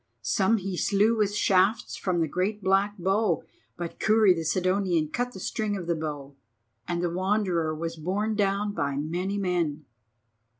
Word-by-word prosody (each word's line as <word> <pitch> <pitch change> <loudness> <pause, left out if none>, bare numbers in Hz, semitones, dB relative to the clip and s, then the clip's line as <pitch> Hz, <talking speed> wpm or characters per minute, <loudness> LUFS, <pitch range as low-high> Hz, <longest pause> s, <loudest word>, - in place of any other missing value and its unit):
Some 215 +2 +2
he 195 -2 -4
slew 210 +5 +3
with 205 -2 0
shafts 200 +2 +2
from 180 -3 -1
the 160 - +1
great 195 +6 -2
black 195 +2 +2
bow, 190 0 +1 0.3
but 170 -1 -6
Kurri 215 -3 +5
the 165 -2 -3
Sidonian 185 -2 +1
cut 245 +7 -2
the - - -9
string 205 +2 -2
of 180 - -6
the 170 - +1
bow, 145 -3 -5 0.5
and 175 0 -1
the 175 - +1
Wanderer 180 -4 0
was 165 +1 -4
borne 200 +7 -1
down 205 0 0
by 140 -7 -1
many 175 +7 -2
men. 170 -6 -1
185 Hz, 165 wpm, -27 LUFS, 170-205 Hz, 0.5 s, Kurri